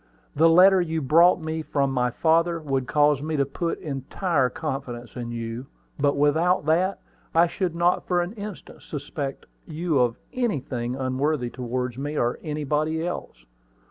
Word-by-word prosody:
"The 165 +3 +5
letter 185 +3 +7
you 160 -2 -1
brought 165 +6 +5
me 160 0 -3
from 140 -3 0
my 125 -1 +1
father 165 +5 +2
would 135 -4 -2
cause 150 -2 +3
me 155 +1 -2
to 140 - +2
put 165 +5 -3
entire 140 0 -1
confidence 135 -5 -5
in 120 -2 -5
you; 115 +2 -5 0.3
but 140 0 +2
without 160 +4 +2
that, 180 +5 +2 0.4
I 165 +1 +6
should 175 0 -2
not 175 +1 +1
for 180 -1 +2
an 175 +4 -6
instant 210 -3 -9
suspect 140 -1 -5 0.2
you 160 -2 0
of 120 -1 +2 0.2
anything 135 - -2
unworthy 130 0 -1
towards 125 0 -3
me, 145 +2 -3
or 120 0 0
anybody 155 +1 -1
else. - - -6
150 Hz, 155 wpm, -25 LUFS, 130-165 Hz, 0.4 s, letter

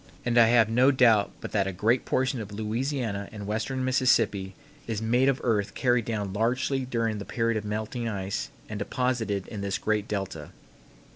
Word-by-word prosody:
And 120 -1 0
I 115 -1 +7
have 115 -2 +5
no 125 +4 +4
doubt 115 -6 +4
but - - -6
that 100 -2 +1
a - - -1
great 110 +7 +1
portion 130 -2 0
of 105 -1 -8
Louisiana 110 -1 -2
and 105 -2 -7
western 110 +5 -2
Mississippi 115 -7 +2 0.3
is 110 -3 -2
made 120 +4 +2
of 135 -1 0
earth 105 -4 0
carried 125 -3 +2
down 105 -4 -3
largely 125 +5 0
during 115 -4 -1
the - - -5
period 115 +2 -1
of 110 - -2
melting 110 +3 -3
ice 95 -2 -3 0.2
and 105 -1 -5
deposited 110 -3 -1
in 105 -3 -6
this 100 -1 -1
great 105 +3 -1
delta. 100 -2 -4
110 Hz, 185 wpm, -27 LUFS, 105-125 Hz, 0.3 s, I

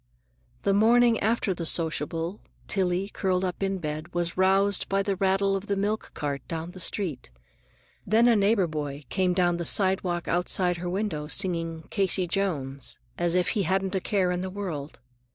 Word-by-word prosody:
The 200 - +2
morning 230 +3 +5
after 220 -2 +1
the 170 -2 -3
sociable, 165 +3 -1 0.3
Tillie, 190 0 0
curled 190 -2 0
up 180 0 -4
in 195 0 0
bed, 155 -1 -5
was 175 -1 -1
roused 195 +1 +2
by 195 0 +1
the 195 0 0
rattle 195 +1 +2
of 195 +2 -4
the 200 - 0
milk 205 +2 -1
cart 140 -2 -3
down 165 +1 -4
the 185 - -10
street. 170 - -1 0.7
Then 225 +4 +4
a 235 - +5
neighbor 205 -1 +3
boy 150 -3 -4
came 185 -2 +1
down 175 -2 +2
the 170 - -3
sidewalk 185 -2 +1
outside 180 0 +2
her 175 +1 -4
window, 180 -6 -2
singing 165 -3 -1
"Casey 190 -2 +1
Jones" 150 -8 -2 0.2
as 175 0 +2
if 180 -1 +2
he 210 - +1
hadn't 190 +2 0
a 190 - 0
care 185 -3 +1
in 180 0 -1
the 190 - -3
world. 175 -9 -5
185 Hz, 175 wpm, -27 LUFS, 170-195 Hz, 0.7 s, morning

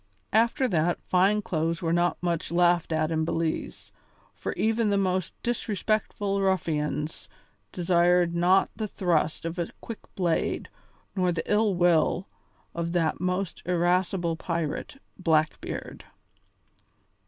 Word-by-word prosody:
After 230 +4 +3
that 170 -3 +1
fine 195 +3 +3
clothes 165 0 -1
were 165 0 +1
not 175 0 +2
much 170 -2 -1
laughed 175 -1 +3
at 155 0 +1
in 160 -1 +1
Belize, 165 0 -3 0.4
for - - -4
even 225 0 +1
the 200 - +2
most 185 -2 0
disrespectful 210 -3 -1
ruffians 160 -5 -1 0.4
desired 175 -1 +3
not 180 +3 +3
the 215 0 -3
thrust 165 -5 0
of 165 +2 -4
a 170 - -1
quick 230 - -7 0.2
blade 175 -4 0 0.5
nor 180 -2 +2
the 170 - -2
ill 210 -2 +2
will 175 +1 +2 0.5
of 170 0 -3
that 165 -3 +1
most 180 0 -2
irascible 175 -1 +1
pirate, 165 - -3 0.2
Blackbeard. 155 -3 -1
175 Hz, 120 wpm, -27 LUFS, 165-195 Hz, 0.5 s, After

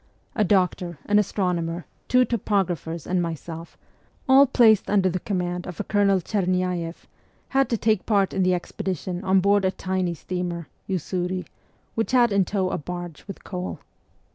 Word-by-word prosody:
A 215 - +3
doctor, 180 -3 +1
an 210 0 +4
astronomer, 180 -4 -1 0.2
two 250 0 +4
topographers, 185 - -1
and 180 0 0
myself, 165 0 -6 0.5
all 275 +1 +7
placed 220 -5 +4
under 195 -2 +3
the 185 - -2
command 180 -2 -2
of 180 - -8
a - - 0
Colonel 200 -2 +3
Chernyaeff, 180 -3 -1 0.4
had 270 0 +2
to 230 - +1
take 215 -2 +1
part 200 -3 +2
in 195 - 0
the 185 0 +3
ex 175 - -6
pedition 185 0 -3
on 190 0 +3
board 200 +1 +3
a 190 - +3
tiny 185 -2 -2
steamer, 175 -1 -4 0.2
Usuri, 180 0 -2 0.5
which 225 +2 -2
had 240 -3 +5
in 200 -1 +3
tow 190 -2 -1
a - - -2
barge 175 0 -7
with 195 - -9
coal. 180 -2 -5
185 Hz, 165 wpm, -24 LUFS, 175-205 Hz, 0.5 s, all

